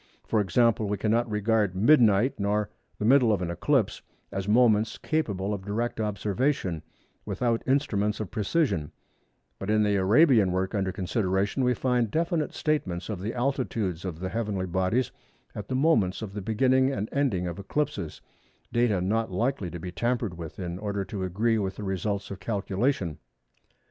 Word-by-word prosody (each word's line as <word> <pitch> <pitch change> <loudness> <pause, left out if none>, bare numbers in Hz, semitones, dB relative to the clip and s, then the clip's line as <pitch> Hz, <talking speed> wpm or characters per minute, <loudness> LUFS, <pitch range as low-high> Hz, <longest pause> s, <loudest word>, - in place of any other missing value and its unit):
For 110 - +2
example, 110 +3 +2
we 105 0 -1
cannot 115 +3 +1
regard 105 -2 +1
"midnight" 115 0 +4
nor 105 +1 0 0.3
"the 105 - -2
middle 125 -1 +5
of 100 -3 +1
an 85 - -2
eclipse" 110 - +1 0.3
as 95 0 -3
moments 110 -1 +3
capable 105 - -1
of 95 -2 -5
direct 115 +4 -2
observation 105 - -1 0.4
without 120 -2 -1
instruments 110 -7 +1
of 105 -4 -5
precision; 105 - 0 0.7
but 95 - -5
in 105 0 +3
the 105 -1 +2
Arabian 110 - +5
work 95 +2 -1
under 95 -3 0
consideration 95 +4 0
we 125 0 +2
find 125 -2 +1
definite 165 - 0
statements 95 - -2
of 100 -4 -4
the 105 +4 -3
altitudes 120 - -1
of 90 -4 -5
the 95 +1 -3
heavenly 105 -3 -2
bodies 95 +7 0 0.4
at 105 -1 -7
the 130 - -2
moments 130 - +2
of 100 -3 -6
the 105 - -4
beginning 130 +6 +2
and 105 -5 -2
ending 125 -11 0
of 85 +1 -5
eclipses—data 110 - -3
not 110 +3 0
likely 110 0 -1
to 85 - -6
be 90 +2 -6
tampered 115 +1 -1
with 85 -2 -8
in 90 -1 -5
order 100 -1 -2
to 95 -1 -5
agree 110 +5 +1
with 95 -2 -2
the 105 - -7
results 100 +1 -2
of 95 - -6
calculation. 100 - -1
105 Hz, 165 wpm, -27 LUFS, 95-120 Hz, 0.7 s, middle